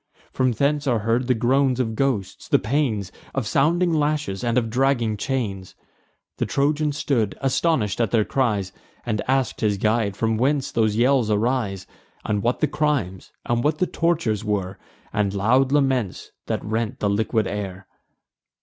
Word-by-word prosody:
From 130 Hz, -1 st, +1 dB
hence 145 Hz, +4 st, 0 dB
are 120 Hz, -3 st, +3 dB
heard 120 Hz, +2 st, +1 dB
the 125 Hz, -, +3 dB
groans 130 Hz, +2 st, +2 dB
of 115 Hz, -3 st, 0 dB
ghosts, 120 Hz, -5 st, -2 dB
the -, -, +4 dB
pains 110 Hz, -5 st, -1 dB, 0.2 s
Of 135 Hz, -4 st, -1 dB
sounding 170 Hz, +8 st, +2 dB
lashes 150 Hz, -9 st, -1 dB
and 120 Hz, 0 st, +1 dB
of 115 Hz, -2 st, 0 dB
dragging 125 Hz, -3 st, +1 dB
chains. 105 Hz, -5 st, -3 dB, 0.6 s
The -, -, -1 dB
Trojan 150 Hz, +2 st, +1 dB
stood 140 Hz, -8 st, -1 dB
astonish'd 135 Hz, -, +1 dB
at 115 Hz, -, +1 dB
their 110 Hz, -1 st, +2 dB
cries, 105 Hz, -8 st, 0 dB, 0.3 s
And 110 Hz, -3 st, -1 dB
ask'd 130 Hz, -2 st, 0 dB
his 105 Hz, -2 st, +1 dB
guide 105 Hz, -1 st, 0 dB
from 110 Hz, -1 st, 0 dB
whence 140 Hz, +3 st, +1 dB
those 110 Hz, -4 st, +1 dB
yells 125 Hz, -1 st, +3 dB
arise; 105 Hz, -3 st, 0 dB, 0.4 s
And 105 Hz, -1 st, 0 dB
what 120 Hz, +3 st, 0 dB
the 155 Hz, -, +3 dB
crimes, 145 Hz, -, -1 dB
and 120 Hz, 0 st, 0 dB
what 150 Hz, +1 st, +1 dB
the 185 Hz, -, +2 dB
tortures 165 Hz, -, 0 dB
were, 100 Hz, -3 st, -2 dB, 0.3 s
And 100 Hz, -1 st, 0 dB
loud 125 Hz, +7 st, +3 dB
laments 130 Hz, -9 st, 0 dB, 0.2 s
that -, -, -2 dB
rent 110 Hz, +3 st, -2 dB
the 105 Hz, -, 0 dB
liquid 110 Hz, +2 st, +1 dB
air. 95 Hz, -2 st, -5 dB
120 Hz, 160 wpm, -23 LUFS, 105-135 Hz, 0.6 s, the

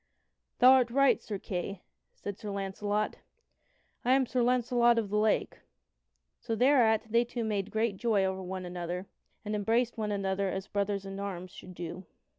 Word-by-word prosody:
"Thou 255 Hz, +1 st, +8 dB
art 255 Hz, -2 st, +5 dB
right, 275 Hz, +3 st, +3 dB
Sir 210 Hz, -, -5 dB
Kay," 185 Hz, 0 st, -5 dB, 0.3 s
said 205 Hz, -, -6 dB
Sir 210 Hz, -, -6 dB
Launcelot, 205 Hz, +1 st, -2 dB, 0.9 s
"and 250 Hz, -, +2 dB
I -, -, +7 dB
am 270 Hz, -1 st, +3 dB
Sir 250 Hz, +1 st, 0 dB
Launcelot 240 Hz, -1 st, +3 dB
of 215 Hz, -3 st, -1 dB
the 210 Hz, -, +1 dB
Lake." 215 Hz, 0 st, +1 dB, 0.8 s
So 230 Hz, -2 st, -3 dB
thereat 240 Hz, -3 st, +4 dB
they 235 Hz, +1 st, +4 dB
two 240 Hz, 0 st, -4 dB
made 205 Hz, -3 st, -1 dB
great 220 Hz, -2 st, 0 dB
joy 210 Hz, -3 st, +2 dB
over 190 Hz, 0 st, -2 dB
one 185 Hz, 0 st, -5 dB
another, 175 Hz, +1 st, -4 dB, 0.4 s
and 210 Hz, -, -3 dB
embraced 225 Hz, +3 st, +1 dB
one 210 Hz, -1 st, -1 dB
another 195 Hz, -1 st, -1 dB
as 190 Hz, 0 st, -3 dB
brothers 200 Hz, -1 st, -2 dB
in 195 Hz, 0 st, -6 dB
arms 185 Hz, -3 st, -5 dB
should 180 Hz, 0 st, -12 dB
do. 175 Hz, +2 st, -7 dB
205 Hz, 175 wpm, -30 LUFS, 190-235 Hz, 0.9 s, Thou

